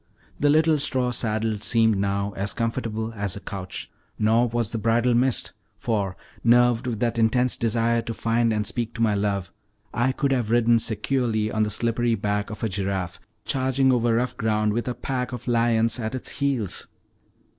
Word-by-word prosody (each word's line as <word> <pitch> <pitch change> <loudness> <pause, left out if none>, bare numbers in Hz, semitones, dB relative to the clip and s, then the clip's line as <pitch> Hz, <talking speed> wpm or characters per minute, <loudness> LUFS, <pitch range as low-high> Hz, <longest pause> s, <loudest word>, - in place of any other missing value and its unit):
The 145 - +3
little 155 +1 +4
straw 130 -3 0
saddle 110 -2 -1
seemed 110 0 +3
now 100 +1 -1
as 100 +1 -3
comfortable 115 -1 -2
as 100 -4 -3
a - - -6
couch, 95 -2 -6 0.3
nor 115 +3 +3
was 120 -2 -1
the 115 - -2
bridle 115 +3 +2
missed; 125 +1 +1 0.2
for, 100 -5 -2 0.3
nerved 120 +1 +4
with 115 -4 -2
that 115 -1 0
intense 125 +3 +2
desire 115 0 +1
to 115 - -5
find 115 0 +1
and 105 -1 0
speak 120 0 -3
to 115 - -4
my 110 -2 +3
love, 100 -3 -1 0.4
I 120 +2 +2
could 140 +1 -1
have 125 -5 0
ridden 120 0 +4
securely 110 -1 0
on 110 - 0
the 105 - +2
slippery 115 +2 0
back 105 0 -2
of 110 - -7
a - - +2
giraffe, 95 -2 -3 0.3
charging 130 0 +2
over 120 -2 +2
rough 125 +2 0
ground 105 -1 +1
with 120 +3 -2
a 125 - -2
pack 125 -2 -3
of 120 0 -7
lions 115 -1 +2
at 110 +2 -3
its 130 - -6
heels. 135 -9 -2
115 Hz, 180 wpm, -24 LUFS, 105-120 Hz, 0.4 s, little